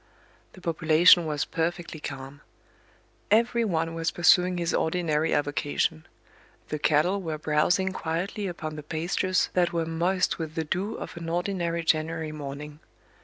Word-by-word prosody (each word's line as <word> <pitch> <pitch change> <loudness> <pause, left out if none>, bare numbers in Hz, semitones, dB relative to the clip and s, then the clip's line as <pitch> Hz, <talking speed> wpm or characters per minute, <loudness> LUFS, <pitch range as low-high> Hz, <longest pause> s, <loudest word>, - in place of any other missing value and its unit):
The 185 - -14
population 165 +1 +5
was 150 -1 -1
perfectly 170 -1 -3
calm; 135 -1 -7 0.9
every 235 +2 +3
one 165 -5 -1
was 165 -1 -1
pursuing 180 +2 +4
his 170 -1 -1
ordinary 160 -2 0
avocation; 145 - -1 0.6
the 150 - -3
cattle 160 +7 +2
were 160 -4 -3
browsing 160 +5 +1
quietly 185 +5 -3
upon 155 -3 -5
the - - -5
pastures 170 +4 0
that 175 -2 +2
were 165 -1 0
moist 175 +4 0
with 160 -1 -5
the 160 - -1
dew 185 +7 -2
of - - -7
an 165 -1 -5
ordinary 170 -1 -1
January 160 0 0
morning. 145 0 -7
165 Hz, 140 wpm, -27 LUFS, 155-180 Hz, 0.9 s, population